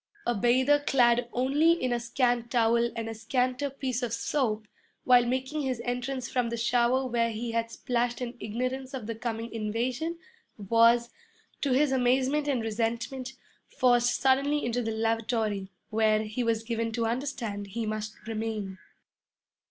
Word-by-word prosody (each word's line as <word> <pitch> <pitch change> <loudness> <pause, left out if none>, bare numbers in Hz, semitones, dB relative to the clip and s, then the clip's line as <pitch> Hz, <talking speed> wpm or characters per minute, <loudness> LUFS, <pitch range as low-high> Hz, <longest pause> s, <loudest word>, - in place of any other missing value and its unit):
A 240 - +2
bather 255 +6 +3
clad 240 -4 +3
only 285 +7 +3
in 255 -7 -1
a 240 - 0
scant 240 0 0
towel 235 -1 +3
and 225 -1 -3
a 225 - -4
scanter 250 +4 -1
piece 265 -2 -3
of 240 -2 -2
soap, 225 -5 -1 0.4
while 245 -1 +5
making 260 +4 -1
his 260 -4 -2
entrance 250 +1 -2
from 245 -2 0
the 235 - -3
shower 240 +3 +2
where 235 -2 +1
he 230 +1 -4
had 230 0 -1
splashed 240 0 -1
in 245 -1 -4
ignorance 255 +5 -3
of 250 -5 -6
the 230 - -3
coming 230 0 -4
invasion, 240 +9 -2 0.4
was, 230 +3 +4 0.5
to 280 - 0
his 280 +2 +3
amazement 265 +3 +2
and 260 -5 0
resentment, 235 +4 -2 0.3
forced 245 -1 +2
suddenly 275 +3 +2
into 240 +1 0
the 225 - -2
lavatory, 220 -3 -1 0.2
where, 215 0 +3
he 220 +3 -3
was 225 -1 0
given 230 0 -2
to 230 0 0
understand, 230 -4 -3
he 225 +3 -4
must 215 0 -4
remain. 215 -4 -4
240 Hz, 155 wpm, -28 LUFS, 225-255 Hz, 0.5 s, while